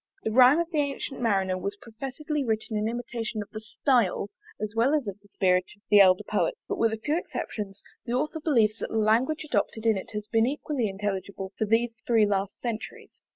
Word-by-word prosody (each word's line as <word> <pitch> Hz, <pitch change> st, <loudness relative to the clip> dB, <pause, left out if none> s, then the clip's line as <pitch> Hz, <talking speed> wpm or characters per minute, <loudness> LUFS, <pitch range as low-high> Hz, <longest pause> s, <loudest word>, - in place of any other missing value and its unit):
The 220 Hz, -, -1 dB
Rime 255 Hz, +5 st, +7 dB
of 340 Hz, 0 st, -2 dB
the 310 Hz, -, +1 dB
Ancyent 280 Hz, -1 st, -2 dB
Marinere 190 Hz, -5 st, +1 dB
was 200 Hz, +2 st, -3 dB
professedly 275 Hz, +6 st, -4 dB
written 220 Hz, -1 st, -2 dB
in 210 Hz, +1 st, 0 dB
imitation 230 Hz, -2 st, -3 dB
of 205 Hz, -, -21 dB
the 215 Hz, -, -6 dB
style, 215 Hz, -3 st, +1 dB, 0.3 s
as 210 Hz, 0 st, -3 dB
well 250 Hz, +6 st, +3 dB
as 285 Hz, -7 st, -1 dB
of 200 Hz, 0 st, -5 dB
the 205 Hz, -, -23 dB
spirit 185 Hz, -2 st, +2 dB
of 205 Hz, -, -34 dB
the 205 Hz, -, +8 dB
elder 185 Hz, +1 st, +5 dB
poets; 210 Hz, 0 st, -1 dB
but -, -, -3 dB
with 230 Hz, -1 st, +3 dB
a 220 Hz, -, -2 dB
few 295 Hz, +8 st, -1 dB
exceptions, 205 Hz, -, -6 dB, 0.2 s
the 235 Hz, -, -2 dB
Author 300 Hz, +5 st, -1 dB
believes 230 Hz, -9 st, +2 dB
that -, -, -4 dB
the -, -, -2 dB
language 230 Hz, +9 st, +2 dB
adopted 230 Hz, -6 st, -1 dB
in 220 Hz, -3 st, +4 dB
it 190 Hz, +4 st, -6 dB
has 210 Hz, 0 st, -4 dB
been 225 Hz, +1 st, +3 dB
equally 275 Hz, -4 st, -1 dB
intelligible 195 Hz, -1 st, -4 dB
for 220 Hz, -, 0 dB
these 225 Hz, +2 st, +1 dB
three 225 Hz, -3 st, +5 dB
last 200 Hz, -1 st, -1 dB
centuries. 230 Hz, -3 st, -5 dB
220 Hz, 210 wpm, -27 LUFS, 205-250 Hz, 0.3 s, the